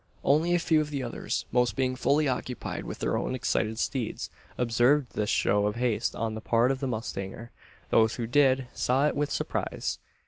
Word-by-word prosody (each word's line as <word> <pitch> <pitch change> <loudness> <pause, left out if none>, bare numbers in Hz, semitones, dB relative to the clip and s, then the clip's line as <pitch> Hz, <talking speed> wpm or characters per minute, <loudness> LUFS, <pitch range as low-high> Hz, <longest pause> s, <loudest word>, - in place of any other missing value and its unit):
Only 160 +5 +3
a - - +4
few 160 -2 +3
of 150 - -3
the 140 -3 -3
others 120 - -3
most 125 0 +2
being 130 -1 0
fully 145 +3 +2
occupied 125 -1 -3
with - - -6
their - - -1
own - - -1
excited 110 -2 0
steeds 120 -1 -2 0.3
observed 125 +2 +3
this 105 -1 -1
show 105 0 +2
of 105 - -2
haste 120 -2 0
on 115 0 -2
the 110 - -5
part 120 +3 +3
of 135 - -2
the 135 - -2
mustanger. 110 -1 -5 0.4
Those 110 0 +4
who 120 - -3
did, 130 +1 +3
saw 130 +3 +2
it - - -1
with 145 0 0
surprise. - - -2
125 Hz, 195 wpm, -28 LUFS, 115-140 Hz, 0.4 s, a